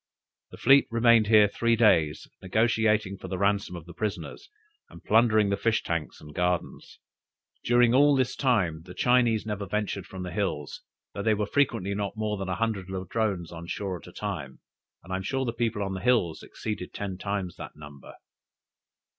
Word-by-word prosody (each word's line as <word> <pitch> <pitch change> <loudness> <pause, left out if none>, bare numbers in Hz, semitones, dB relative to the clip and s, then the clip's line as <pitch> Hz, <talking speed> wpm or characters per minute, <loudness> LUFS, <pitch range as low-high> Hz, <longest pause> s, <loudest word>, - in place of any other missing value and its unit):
The - - -12
fleet 135 +2 +5
remained 115 -1 +4
here 105 -1 +6
three 115 +3 +1
days, 80 -10 +3
negotiating 110 -1 +1
for - - -8
the 95 0 -4
ransom 100 -1 0
of 85 -3 -9
the 85 - -11
prisoners, 105 - -5 0.4
and - - -14
plundering 110 -2 +4
the 100 - 0
fish 115 -1 +1
tanks 85 -3 -3
and 75 0 -12
gardens. 90 +1 -2 0.7
During 120 0 +4
all 145 +2 +5
this 130 -2 0
time, 95 - +1
the 90 - -10
Chinese 120 -3 +2
never 105 -2 -4
ventured 100 -2 -3
from 95 -1 -7
the 90 - -5
hills, 90 -7 -3 0.3
though 100 - -4
there 110 0 +2
were 105 - 0
frequently 115 -6 0
not 100 +1 -3
more 105 -1 -2
than 95 -1 -4
a 90 - -1
hundred 100 -2 -2
Ladrones 95 -1 -2
on 85 0 -9
shore 95 -1 -4
at - - -15
a - - -11
time, 85 -10 -5 0.4
and 95 +2 -7
I - - 0
am - - -4
sure 130 +7 -2
the 115 - -2
people 115 -3 -1
on 95 -1 -3
the 95 - -5
hills 115 -10 +1
exceeded 105 -4 -6
ten 95 -2 -5
times 100 -3 -3
that - - -9
number. 70 -2 -12
100 Hz, 190 wpm, -27 LUFS, 90-115 Hz, 0.7 s, here